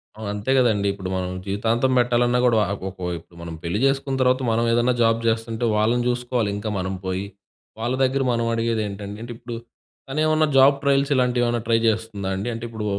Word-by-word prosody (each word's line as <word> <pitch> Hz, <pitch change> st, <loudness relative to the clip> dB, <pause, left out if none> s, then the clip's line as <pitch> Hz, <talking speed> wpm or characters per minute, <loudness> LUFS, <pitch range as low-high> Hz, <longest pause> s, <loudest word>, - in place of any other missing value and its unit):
ఆ! 110 Hz, -, -11 dB
అంతే 105 Hz, +5 st, -2 dB
గదండీ. 110 Hz, -5 st, +2 dB
ఇప్పుడు 95 Hz, -2 st, -6 dB
మనం 90 Hz, -1 st, -2 dB, 0.2 s
జీవితాంతం 115 Hz, +6 st, 0 dB
బెట్టాలన్నా 120 Hz, 0 st, +2 dB
గూడా 115 Hz, -2 st, +4 dB
వా -, -, +2 dB, 0.2 s
ఒక్కొవైపు 95 Hz, -2 st, -6 dB
ఇప్పుడు 85 Hz, +1 st, -20 dB
మనం 85 Hz, -1 st, -6 dB
పెళ్లి 85 Hz, +5 st, -1 dB
జేసుకున్న 135 Hz, 0 st, 0 dB
తర్వాత 130 Hz, +1 st, +3 dB
మనమేదన్నా 115 Hz, +2 st, +2 dB
జాబ్ 115 Hz, 0 st, +3 dB
జేస్తుంటే 115 Hz, +1 st, -1 dB
వాళ్ళని 115 Hz, +3 st, +2 dB
జూసుకోవాలి 120 Hz, -2 st, 0 dB
ఇంకా 110 Hz, +1 st, -4 dB
మనం 95 Hz, +1 st, -2 dB
పోయి, 95 Hz, +1 st, -2 dB, 0.6 s
వాళ్ళ 120 Hz, +3 st, -1 dB
దగ్గర 135 Hz, +1 st, +1 dB
మనం 115 Hz, -1 st, 0 dB
అడిగేదేంటండి? 105 Hz, -3 st, -2 dB
అంటే 120 Hz, -, -7 dB
ఇప్పుడు 120 Hz, 0 st, -7 dB, 0.5 s
తనేమన్నా 155 Hz, +2 st, +2 dB
జాబ్ 135 Hz, +1 st, +7 dB
ట్రయల్స్ 140 Hz, 0 st, +2 dB
ఇలాంటివేమన్నా 120 Hz, -2 st, +1 dB
ట్రై 115 Hz, -1 st, +3 dB
చేస్తుందా 110 Hz, -3 st, -1 dB
అండి? 105 Hz, +5 st, -3 dB
అంటే 115 Hz, -, -6 dB
ఇప్పుడు 110 Hz, -2 st, -5 dB
115 Hz, 175 wpm, -23 LUFS, 105-125 Hz, 0.6 s, జాబ్